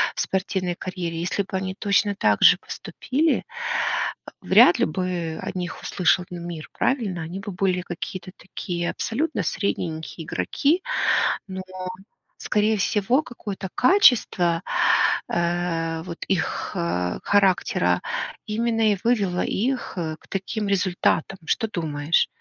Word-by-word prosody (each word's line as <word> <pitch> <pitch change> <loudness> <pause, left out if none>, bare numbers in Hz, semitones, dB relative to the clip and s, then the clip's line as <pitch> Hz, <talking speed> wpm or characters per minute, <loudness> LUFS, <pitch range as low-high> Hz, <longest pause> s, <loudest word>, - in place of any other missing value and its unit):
в - - -5
спортивной 185 -2 -1
карьере, 175 -2 -4
если 195 +3 -1
бы 190 - -7
они 190 0 -3
точно 205 0 +2
также - - +5
поступили, 300 +5 -1 1.0
вряд - - +6
ли - - +4
бы 175 -4 -3
о - - -4
них 180 -1 -4
услышал 180 -1 +2
бы 175 - -6
мир, 170 -2 -7
правильно? 210 -10 0
Они 175 +4 -6
бы 200 +1 -6
были 180 0 0
какие-то 180 +1 -6
такие 175 -1 -4
абсолютно 270 - -2
средненькие 165 -3 -3
игроки, 300 - +1 0.7
но, 190 0 -5 0.8
скорее 215 +1 +1
всего, 210 +8 +2
какое-то 205 -7 -6
качество, 215 - +4 0.7
э, 170 -1 -1
вот 170 -2 -7
их, 190 -4 -1
а, 90 +1 -1
характера 195 -2 +2 0.4
именно 225 0 +1
и 200 - -1
вывело 200 -7 +2
их, 255 +5 -1
э, 160 -3 -3
к - - -22
таким 200 +2 -3
результатам. 190 -1 +1
Что 225 - 0
думаешь? 160 -4 0
185 Hz, 125 wpm, -24 LUFS, 170-210 Hz, 1.0 s, вряд